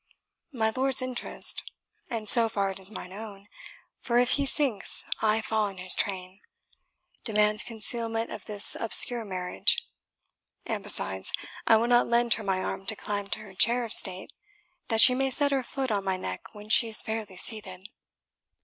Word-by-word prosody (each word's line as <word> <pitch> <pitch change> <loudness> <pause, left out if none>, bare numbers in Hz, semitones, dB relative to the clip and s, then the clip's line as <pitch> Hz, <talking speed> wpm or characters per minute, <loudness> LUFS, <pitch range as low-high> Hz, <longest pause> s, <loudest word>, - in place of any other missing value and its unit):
My 220 -5 -2
lord's 265 0 -1
interest 255 -1 0 0.5
and 225 -4 -6
so 230 +2 +7
far 200 -3 -2
it 190 - -9
is 190 0 -1
mine 185 -4 -10
own, 205 -1 -11 0.5
for 240 -1 -2
if 245 +1 +2
he 280 -1 0
sinks 265 -8 +1 0.2
I 220 0 0
fall 220 -1 -2
in 195 -1 -10
his 185 0 +2
train 185 -1 -4 0.8
demands 210 -1 0
concealment 225 0 -4
of 200 - -9
this 205 -1 +4
obscure 235 +1 +5
marriage; 185 -3 -2 0.8
and - - -4
besides, 95 0 +1 0.4
I 225 - +5
will 225 +1 +1
not 240 0 +2
lend 235 0 +1
her 220 - -6
my 190 -2 -2
arm 195 - -6
to 220 - -2
climb 205 -1 -6
to 215 - -5
her 205 -3 -14
chair 235 +6 +1
of 230 - -3
state, 190 +5 +3 0.5
that 225 -1 +2
she 250 - +8
may 270 +1 -1
set 285 +2 0
her 270 -1 0
foot 260 0 -5
on 200 -2 -2
my 190 -1 -3
neck 95 - -8
when 210 0 -12
she 230 +2 +4
is 220 -1 +5
fairly 220 -3 -6
seated. 190 -3 -2
220 Hz, 175 wpm, -26 LUFS, 195-235 Hz, 0.8 s, she